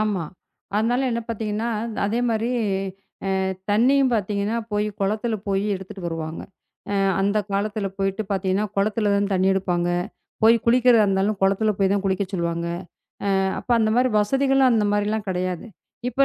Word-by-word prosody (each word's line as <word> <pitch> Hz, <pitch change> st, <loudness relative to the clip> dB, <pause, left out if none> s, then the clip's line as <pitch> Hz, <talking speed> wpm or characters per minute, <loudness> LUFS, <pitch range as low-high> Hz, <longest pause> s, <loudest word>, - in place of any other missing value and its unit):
ஆமா. 205 Hz, -6 st, 0 dB, 0.5 s
அதனால 245 Hz, +5 st, +1 dB
என்ன 235 Hz, 0 st, -1 dB
பாத்தீங்கன்னா, 220 Hz, 0 st, -2 dB, 0.4 s
அதே 225 Hz, +4 st, 0 dB
மாரி 225 Hz, +1 st, 0 dB, 0.9 s
அ -, -, +1 dB, 0.3 s
தண்ணீயும் 255 Hz, +4 st, +4 dB
பாத்தீங்கன்னா, 205 Hz, +1 st, -1 dB, 0.2 s
போய் 210 Hz, 0 st, +1 dB
குளத்துல 215 Hz, +3 st, 0 dB
போயி 195 Hz, +1 st, 0 dB
எடுத்துட்டு 190 Hz, 0 st, -8 dB
வருவாங்க. 165 Hz, -1 st, -4 dB, 0.5 s
அ -, -, 0 dB, 0.3 s
அந்தக் 200 Hz, +1 st, 0 dB
காலத்துல 205 Hz, +1 st, -1 dB
போயிட்டு 195 Hz, +2 st, -1 dB
பாத்தீங்கன்னா, 195 Hz, +2 st, 0 dB
குளத்துல 205 Hz, +1 st, +1 dB
தான் 200 Hz, 0 st, +1 dB
தண்ணீ 190 Hz, +1 st, +2 dB
எடுப்பாங்க. 180 Hz, -2 st, 0 dB, 0.6 s
போய் 230 Hz, +1 st, +7 dB
குளிக்கிறதா 240 Hz, -2 st, +5 dB
இருந்தாலும் 195 Hz, +1 st, +1 dB
குளத்துல 200 Hz, +3 st, +3 dB
போய்தான் 195 Hz, +1 st, +2 dB
குளிக்கச் 190 Hz, +1 st, -1 dB
சொல்லுவாங்க. 170 Hz, -1 st, -1 dB, 0.7 s
ஆ -, -, +2 dB, 0.2 s
அப்ப -, -, -12 dB
அந்தமாரி 230 Hz, +3 st, +2 dB
வசதிகள் 270 Hz, +4 st, +3 dB
அந்தமாரிலாம் 210 Hz, -1 st, +1 dB
கிடையாது. 185 Hz, +2 st, -2 dB, 0.4 s
இப்ப 270 Hz, +3 st, +3 dB
205 Hz, 135 wpm, -23 LUFS, 195-225 Hz, 0.9 s, போய்